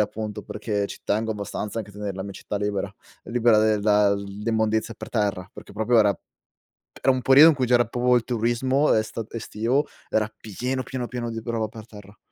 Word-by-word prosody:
appunto, 105 0 -3
perché 105 -1 -3
ci - - -9
tengo 110 +1 0
abbastanza 105 +1 -5
anche 105 -2 -6
a - - -19
tener 105 -2 -4
la 95 - -5
mia 100 0 -7
città 105 - -5
libera, 100 -1 -2 0.3
libera 115 -2 +3
del 110 -1 +3
da 105 -1 +4
l'immondizia 110 +2 -1
per - - -9
terra, 100 -4 -1
perché - - -12
proprio 110 +3 +2
era 105 -3 +3 0.8
era 135 - +4
un 130 -1 -1
periodo 140 +5 +8
in 160 - +3
cui 130 -2 0
c'era 120 -1 +4
proprio 125 +2 +2
il 120 - +2
turismo 125 +4 +1
esta 110 +1 -1
estivo, 115 +5 -1 0.2
era 110 0 0
pieno, 125 +5 -3
pieno, 125 -2 -4
pieno 120 -1 -4
di 115 - -5
roba 115 -2 -2
per 110 0 -11
terra. 105 -1 -14
110 Hz, 195 wpm, -24 LUFS, 105-120 Hz, 0.8 s, periodo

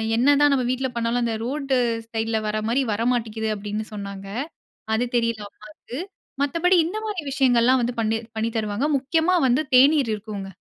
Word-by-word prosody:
என்னதன் 285 +4 +4
நம்ம 255 -2 +1
வீட்ல 255 +1 0
பண்ணாலும் 235 +1 0
அந்த 230 - 0
ரோட் 275 +2 -4 0.4
சைடில 225 0 0
வர 215 0 -1
மாரி 250 +4 +2
வரமாட்ங்குது 225 -1 -1
அப்டின்னு 210 +1 -4
சொன்னாங்க. 200 -1 -7 0.7
அது 245 - +1
தெரியல 230 -2 0
அம்மாவுக்கு 215 +6 -10 0.4
மத்தபடி 335 +6 +2
இந்த 370 +6 -4
மாரி 415 -6 -3
விஷயங்கள்லாம் 255 -2 +3
வந்து 240 +1 -2
பண்ணி 220 0 +1 0.2
பண்ணி 225 +1 0
தருவாங்க 215 +6 -1
முக்கியமா 320 +6 +1
வந்து 260 +5 +2
தேநீர் 275 -1 +5
இருக்குங்க. 205 -2 -7
240 Hz, 155 wpm, -23 LUFS, 220-275 Hz, 0.7 s, தேநீர்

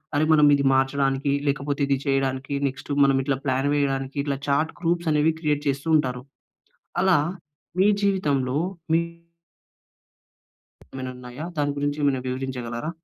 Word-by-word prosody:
అరె! 150 - +3
మనం 150 -1 +6
ఇది 140 - 0
మార్చడానికి, 135 +1 +1
లేకపోతే 140 +1 -1
ఇది 140 -1 +2
చేయడానికి 135 0 -1
నెక్స్టు 135 +2 -7
మనం 135 -1 +3
ఇట్లా 135 0 0
ప్లాన్ 130 +1 +1
వేయడానికి 135 -1 -1
ఇట్లా 140 -1 -2
చాట్ 145 +3 +1
గ్రూప్స్ 170 -1 0
అనేవి 150 +2 +3
క్రియేట్ 150 -2 0
చేస్తూ 140 +3 -3
ఉంటారు. 125 -3 -2 0.8
అలా 190 -3 +5 0.6
మీ 195 - +5 0.2
జీవితంలో 145 -10 +1 0.4
మీ 165 - +5 1.9
ఏమైనా 130 -1 -5
ఉన్నాయా? 125 +4 -8
దాని 145 -1 0
గురించి 145 +1 -1
ఏమైనా 135 -2 +2
వివరించగలరా? 125 0 -4
140 Hz, 135 wpm, -24 LUFS, 135-150 Hz, 1.9 s, మనం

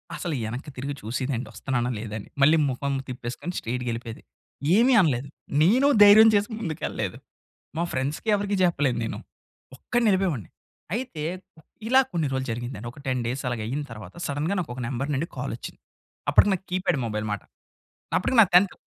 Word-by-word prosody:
అసలు 170 -5 -3
ఎనక్కి 125 +6 -6
తిరిగి 140 +3 -3
చూసేదండి 125 +1 -3
వస్తన్నానా 120 +3 -1
లేదా 110 -1 -6
అని. - - -11
మళ్ళీ 155 +3 +6
ముఖం 140 +2 -2
తిప్పేసుకొని 125 +8 -5
స్ట్రెయిట్‌గేళ్ళిపోయేది. 120 -1 -4 0.5
ఏమీ 245 +4 +5
అనలేదు. 140 -4 +1 0.4
నేను 250 - +5 0.2
ధైర్యం 215 +2 +9
చేసి 205 +3 +2
ముందుకు 165 -7 -4
ఎళ్ళలేదు. - - -4 0.6
మా 170 - +1
ఫ్రెండ్స్‌కి 140 +11 -2
ఎవరికీ 200 0 -1
చెప్పలేను 145 -9 +2
నేను. - - -4 0.6
ఒక్కడినే 240 - +1
ఎళ్ళిపోయేవాడిని. 175 - 0 0.5
అయితే 235 -12 -4 0.6
ఇలా 260 +2 +6
కొన్ని 160 -4 0
రోజులు 130 0 -2
జరిగిందండి. 120 -1 -5
ఒక 145 - -15
10 130 -1 0
డేస్ 130 +3 -3
అలాగైయిన 120 +5 -3
తర్వాత, 110 -2 -9
సడెన్‌గా 150 +7 -1
నాకు 160 -9 -4
ఒక 130 - -5
నంబర్ 140 +4 -2
నుండి 160 +5 -1
కాల్ 130 -1 -3
వచ్చింది. - - -9 0.5
అప్పటికి 205 - +6
నాకు 190 - -10
కీప్యాడ్ 185 -6 +1
మొబైల్ 105 -1 -3
మాట. 105 - -3 0.8
అప్పటికి 240 +7 0
నా 210 - +8
10థ్ 185 +1 +5
140 Hz, 160 wpm, -25 LUFS, 120-185 Hz, 0.8 s, ధైర్యం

